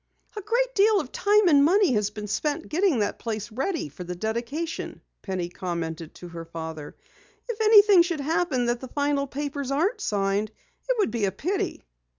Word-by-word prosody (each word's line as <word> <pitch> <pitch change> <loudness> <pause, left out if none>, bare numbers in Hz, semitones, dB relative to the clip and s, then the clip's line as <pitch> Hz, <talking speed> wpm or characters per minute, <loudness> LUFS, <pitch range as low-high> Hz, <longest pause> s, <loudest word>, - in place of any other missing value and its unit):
"A 420 - -4
great 485 +5 0
deal 420 0 +4
of 270 -8 -5
time 415 -1 +3
and 285 -4 +6
money 375 +3 +4
has 210 -2 +1
been 210 0 -7
spent 300 - -2
getting 350 -2 +2
that 205 - -2
place 220 -1 -4
ready 275 - -2
for 145 +5 -9
the 180 0 -5
dedication," 235 - -4 0.2
Penny 185 -3 -3
commented 170 -3 -5
to 175 - -10
her 170 -1 -7
father. 160 -2 -7 0.5
"If 460 -2 -4
anything 415 -3 +7
should 340 -2 -1
happen 305 -3 0
that 240 0 0
the 260 - -8
final 285 +1 0
papers 285 0 -4
aren't 360 - 0
signed, 200 - 0 0.4
it - - +2
would 415 - +1
be 230 -4 0
a 195 - 0
pity." 375 - -3
280 Hz, 180 wpm, -25 LUFS, -, 0.5 s, anything